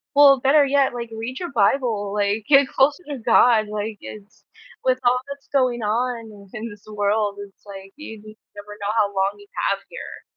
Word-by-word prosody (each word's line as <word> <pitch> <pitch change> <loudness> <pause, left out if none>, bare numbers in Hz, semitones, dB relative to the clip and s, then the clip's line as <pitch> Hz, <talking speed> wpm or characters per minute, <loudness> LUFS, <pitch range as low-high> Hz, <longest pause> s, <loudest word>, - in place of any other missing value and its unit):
well, 280 -2 +7
better 285 +3 +4
yet, 275 -2 +2
like 235 -1 -6
read 225 +3 -6
your 350 -5 -5
Bible, 215 -3 +1
like, 205 +1 0
get 275 -2 +5
closer 285 +6 +1
to 280 - -4
God. 225 -1 +4
Like 210 0 -4
it's 210 -1 -12 0.4
with 255 0 +2
all 250 +1 +3
that's 280 -1 -9
going 250 -3 +1
on 230 +1 -2 0.2
in 225 +2 -5
this 205 -1 -15
world, 205 0 0
it's 195 - -23
like 195 -1 -11
you 225 -8 -9
never 210 -1 -13
know 200 - -4
how 210 -2 +3
long 195 +1 +1
you 205 0 -16 0.2
have 195 - -1
here. - - -9
225 Hz, 185 wpm, -22 LUFS, 205-260 Hz, 0.4 s, well